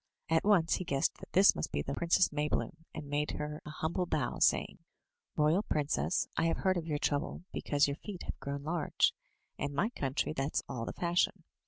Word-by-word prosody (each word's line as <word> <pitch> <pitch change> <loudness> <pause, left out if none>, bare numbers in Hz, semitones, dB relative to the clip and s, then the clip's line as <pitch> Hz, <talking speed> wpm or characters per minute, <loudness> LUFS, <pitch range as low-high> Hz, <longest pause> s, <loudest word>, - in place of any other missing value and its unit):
At 160 0 +3
once 185 -6 +4
he - - -3
guessed 140 -5 0
that - - -12
this 195 +2 +7
must 75 - -3
be 70 - -1
the - - -3
Princess 170 +2 +3
Maybloom, 150 +2 -2
and 155 -2 -7
made 145 +1 0
her 150 0 -4
an 150 - -8
humble 165 +4 -2
bow, - - -1
saying: - - +2 0.6
"Royal 155 +5 +3
princess, 150 -1 0
I - - +1
have 165 - +1
heard 190 -1 +2
of 170 -2 -3
your 150 -2 0
trouble 145 +4 -1
because 145 0 +2
your 140 +1 -3
feet 200 -4 -7
have - - -6
grown 140 0 -4
large; 160 0 +1 0.5
in 145 0 -2
my 200 +10 +2
country 140 - -1
that's 135 +1 -1
all 115 -2 -4
the - - -5
fashion. 175 0 +1
155 Hz, 200 wpm, -32 LUFS, 145-170 Hz, 0.6 s, this